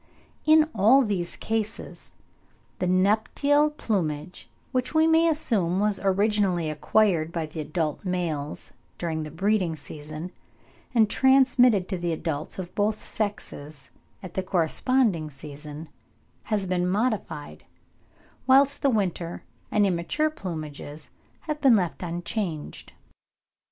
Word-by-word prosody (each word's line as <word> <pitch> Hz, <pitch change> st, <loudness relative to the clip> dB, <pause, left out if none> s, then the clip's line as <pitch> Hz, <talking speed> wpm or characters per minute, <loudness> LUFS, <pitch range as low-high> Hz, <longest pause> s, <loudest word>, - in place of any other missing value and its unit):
In 310 Hz, 0 st, +6 dB
all 230 Hz, +7 st, +5 dB
these 195 Hz, -6 st, -2 dB
cases, 220 Hz, 0 st, -4 dB, 0.7 s
the 180 Hz, -, 0 dB
nuptial 220 Hz, +11 st, +3 dB
plumage 180 Hz, -, -3 dB, 0.2 s
which 255 Hz, +3 st, -2 dB
we 315 Hz, 0 st, +5 dB
may 325 Hz, +1 st, +4 dB
assume 205 Hz, -, +1 dB
was 210 Hz, -1 st, +1 dB
originally 195 Hz, -4 st, +1 dB
acquired 165 Hz, +1 st, +2 dB
by 165 Hz, -2 st, -2 dB
the 155 Hz, +1 st, -8 dB
adult 155 Hz, 0 st, -2 dB
males 165 Hz, -6 st, -3 dB, 0.3 s
during 160 Hz, -2 st, -2 dB
the 155 Hz, -, -5 dB
breeding 185 Hz, +1 st, 0 dB
season, 155 Hz, +3 st, -8 dB, 0.6 s
and 220 Hz, -2 st, +5 dB
transmitted 250 Hz, -5 st, +4 dB
to 190 Hz, -3 st, -3 dB
the 170 Hz, -1 st, -1 dB
adults 155 Hz, -2 st, -4 dB
of 180 Hz, -2 st, -6 dB
both 210 Hz, +1 st, 0 dB
sexes 150 Hz, -, -5 dB, 0.3 s
at 180 Hz, -2 st, -8 dB
the 190 Hz, -, -1 dB
corresponding 185 Hz, +1 st, +1 dB
season, 150 Hz, +2 st, -9 dB, 0.6 s
has 210 Hz, -3 st, 0 dB
been 180 Hz, -1 st, 0 dB
modified, 205 Hz, -8 st, -2 dB, 0.8 s
whilst 275 Hz, +2 st, +5 dB
the 280 Hz, -, +3 dB
winter 180 Hz, -7 st, -2 dB, 0.3 s
and 210 Hz, -1 st, +3 dB
immature 190 Hz, -, 0 dB
plumages 155 Hz, -, -7 dB, 0.3 s
have 305 Hz, -1 st, -4 dB
been 265 Hz, -5 st, +6 dB
left 180 Hz, -5 st, -1 dB
unchanged. 175 Hz, -1 st, -4 dB
185 Hz, 120 wpm, -26 LUFS, 160-225 Hz, 0.8 s, In